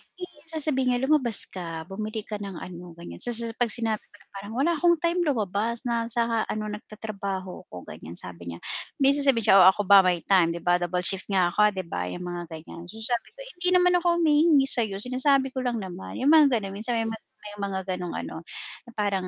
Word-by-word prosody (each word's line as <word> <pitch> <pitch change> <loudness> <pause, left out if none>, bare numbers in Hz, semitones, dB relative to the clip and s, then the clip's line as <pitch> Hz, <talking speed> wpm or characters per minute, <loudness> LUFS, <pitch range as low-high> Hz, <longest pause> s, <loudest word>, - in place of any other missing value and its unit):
i 365 - -10 0.2
sasabihin 280 -6 0
niya 245 - -2
lumabas 265 -6 +3
ka 165 -3 -6
bumili 215 +2 -4
ka 210 -1 -6
ng 195 -3 -6
ano, 175 -1 -9
ganyan. 170 0 -10
Sa 240 -1 0
sa 230 0 -2
pag 245 - +3
sinabi 225 -1 0
ko - - -22
na, 195 -1 -22
"Parang 205 +3 -8
wala 290 +7 +2
akong 345 -1 +5
time 340 +1 +1
lumabas 225 -1 -1
na 235 -1 -1
sa 230 -1 0
ano 215 - -3
nagtatrabaho 200 -3 -6
ko," 90 -1 -10
ganyan 85 +2 -10
sabi 85 -1 -7
niya, - - -12 0.4
may 275 - +6
sasabihin 275 -6 +3
niya, 195 - +8
"Oh 185 - +9
ako 205 +2 +4
ba 200 +1 +8
may 180 -3 +2
time 175 -4 +3
'di 170 - -7
ba 175 0 +3
double 180 +1 -1
shift 195 0 -3
nga 185 -3 +2
ako 210 +1 +3
'di 185 - -2
ba?" 90 0 -2
'yong 180 - -6
mga 175 -1 -5
ganyan. 165 +2 -10
Sabi 225 +4 -3
ko, - - -20 0.2
"Hindi 360 - -1
naman 360 0 +5
ako 345 0 +2
humihingi 310 -3 +4
sayo, 230 -7 +1
sinasabi 260 +5 +1
ko 260 - -4
lang 250 -2 -1
naman," 190 -4 -6
yung 290 - +5
mga 295 -5 +6
ganun 200 -4 -3
minsan 235 +2 -1
may 225 - +1
mga 225 0 -4 0.3
may 205 0 -8
mga 195 -1 -2 0.2
ganong 180 -1 -5
ano, - - -5 0.5
na - - -11
parang 200 -3 -1
215 Hz, 220 wpm, -26 LUFS, 185-255 Hz, 0.5 s, Oh